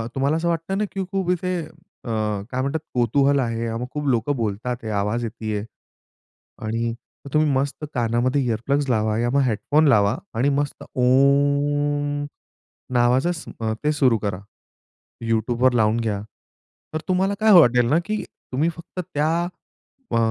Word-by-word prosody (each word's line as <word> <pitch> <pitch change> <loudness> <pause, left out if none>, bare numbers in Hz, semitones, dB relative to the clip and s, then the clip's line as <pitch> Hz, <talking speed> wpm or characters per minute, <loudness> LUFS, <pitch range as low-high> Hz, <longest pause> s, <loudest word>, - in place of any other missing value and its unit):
तुम्हाला 140 +3 +1
असं 165 +1 -1
वाटतं 170 +3 -1
ना 210 - +1
की 195 - -2
खूप 190 -2 -1
इथे 180 +1 -1
अ, 155 -5 -14 0.4
काय 130 0 -1
म्हणतात 140 +4 -1
कुतूहल 135 +4 +3
आहे 115 -2 -1
मग 115 +2 -3
खूप 150 -1 -3
लोकं 125 +2 +1
बोलतात, 115 +2 -3
आवाज 105 +4 0
येतीये. 110 -2 -3 1.0
आणि 115 +2 -1 0.4
मग 140 - -10
तुम्ही 155 0 +3
मस्त 140 +3 -1
कानामध्ये 120 +3 +1
इअर 115 -3 0
प्लग्स 140 0 +1
लावा 110 -2 +1
किंवा 120 +1 +1
मग 135 - +3
हेडफोन 145 +7 +2
लावा 105 -2 +4 0.2
आणि 130 +5 +3
मस्त 145 -1 -3
ओम, 145 +2 +2 0.7
नावाच 125 +4 +3
स 160 - -9 0.4
ते 150 - +2
सुरू 130 -6 +3
करा. 100 -3 -3 0.9
YouTubeवर 120 +3 +2
लावून 110 0 +3
घ्या. 105 -3 -2 0.7
तर 155 - -1
तुम्हाला 190 +2 +1
काय 220 0 +4
वाटेल 125 -5 +5
ना 150 - +4
की 215 0 -2 0.3
तुम्ही 150 +6 +2
फक्त 170 +2 -9
त्या 150 +2 +1 0.8
अ, - - +2
130 Hz, 150 wpm, -23 LUFS, 115-150 Hz, 1.0 s, वाटेल